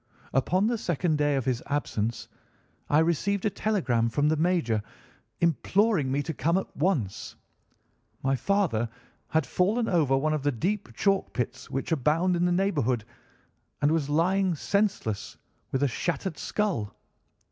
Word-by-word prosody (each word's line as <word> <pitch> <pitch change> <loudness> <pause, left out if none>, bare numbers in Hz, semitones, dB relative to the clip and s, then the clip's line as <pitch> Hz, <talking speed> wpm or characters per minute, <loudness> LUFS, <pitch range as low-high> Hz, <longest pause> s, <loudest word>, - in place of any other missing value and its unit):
Upon 180 +9 +2
the 230 0 0
second 170 -3 0
day 145 -1 +2
of 135 -3 -1
his 125 -3 0
absence 115 -6 -2 0.6
I 145 - +4
received 170 +5 +1
a 210 - +2
telegram 135 - +1
from 145 +6 +1
the 155 - +3
major, 160 -9 +1 0.6
imploring 170 -1 +2
me 140 +2 0
to 160 - -4
come 165 +5 +1
at 190 - -4
once. 145 - -1 0.9
My 135 0 +2
father 140 - +1 0.4
had 160 -2 +1
fallen 210 - +1
over 150 -7 +3
one 155 +3 +1
of 155 - -1
the 145 +1 +1
deep 190 - -2
chalk 195 -1 +1
pits 125 +1 -3
which 135 +5 -3
abound 160 +5 +2
in 175 +1 +1
the 180 - +2
neighbourhood, 145 - +1 0.7
and 145 +1 +3
was 155 -3 0
lying 180 +4 +2
senseless, 195 - -1 0.3
with 135 +1 0
a - - +4
shattered 175 - -3
skull. 185 - -1
160 Hz, 150 wpm, -27 LUFS, 135-190 Hz, 0.9 s, I